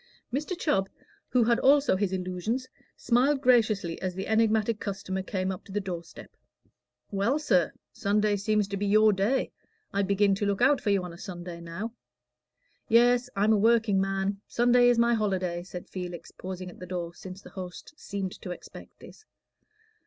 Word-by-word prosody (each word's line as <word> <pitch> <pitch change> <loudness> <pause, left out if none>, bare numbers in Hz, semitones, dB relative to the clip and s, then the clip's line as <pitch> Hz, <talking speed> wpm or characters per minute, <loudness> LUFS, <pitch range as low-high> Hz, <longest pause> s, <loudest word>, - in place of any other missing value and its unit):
Mr. 305 +7 -2
Chubb, 195 - +1 0.4
who 250 -2 +3
had 235 +1 +3
also 280 -4 +4
his 195 0 0
illusions, 185 +7 -2 0.3
smiled 260 +4 +2
graciously 220 - +2
as 185 -1 -3
the 190 - -4
enigmatic 220 0 +2
customer 190 -1 -3
came 190 0 -2
up 185 - -7
to - - -13
the 205 - -1
door 180 -4 -5
step. 170 - -14 0.8
"Well, 205 +8 +1
sir, 185 - +2 0.2
Sunday 205 +1 +1
seems 210 0 +1
to 200 - -3
be 205 +1 -1
your 215 +1 +5
day: 205 +8 0 0.4
I 200 - +1
begin 200 0 +3
to 200 +2 -1
look 200 -1 0 0.2
for - - -1
you 200 -2 +2
on 180 -1 -7
a 170 - -13
Sunday 175 -3 -7
now." 180 +7 -6 1.0
"Yes, 245 +2 +4
I'm 210 +2 +3
a - - +4
workingman; 200 -3 +2
Sunday 245 +1 +4
is 240 - +3
my 235 0 +4
holiday," 190 -5 -1
said 180 0 -9
Felix, 180 -2 -7
pausing 185 -1 -7
at - - -16
the 180 - -8
door 175 -2 -4
since 185 +2 -10
the - - -12
host 185 +7 -8
seemed 195 -8 -4
to - - -7
expect 180 - -10
this. 435 - -14
200 Hz, 175 wpm, -28 LUFS, 185-230 Hz, 1.0 s, your